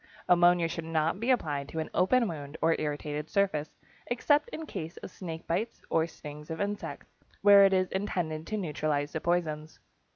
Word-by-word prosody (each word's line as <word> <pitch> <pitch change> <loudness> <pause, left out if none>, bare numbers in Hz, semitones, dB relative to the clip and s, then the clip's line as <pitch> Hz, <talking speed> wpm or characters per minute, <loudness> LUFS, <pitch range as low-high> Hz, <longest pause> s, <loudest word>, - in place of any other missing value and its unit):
Ammonia 175 -1 +5
should 165 0 -5
not 165 +2 0
be 235 +4 -2
applied 145 - 0
to - - -7
an 160 - -3
open 230 +7 +3
wound 145 -3 -6
or 165 0 +3
irritated 150 0 -3
surface, 175 -7 0 0.3
except 290 - +2
in 320 -8 -6
case 170 - -6
of - - -8
snake 165 -3 -7
bites 220 +8 -2
or 160 0 +3
stings 150 -2 -10
of 160 - -4
insects, 205 0 -4 0.3
where 200 -1 +9
it 195 - +4
is 185 -1 +2
intended 170 -5 -2
to 215 - -2
neutralize 150 -5 -1
the 160 - -2
poisons. 160 -3 -1
165 Hz, 175 wpm, -29 LUFS, 155-195 Hz, 0.3 s, where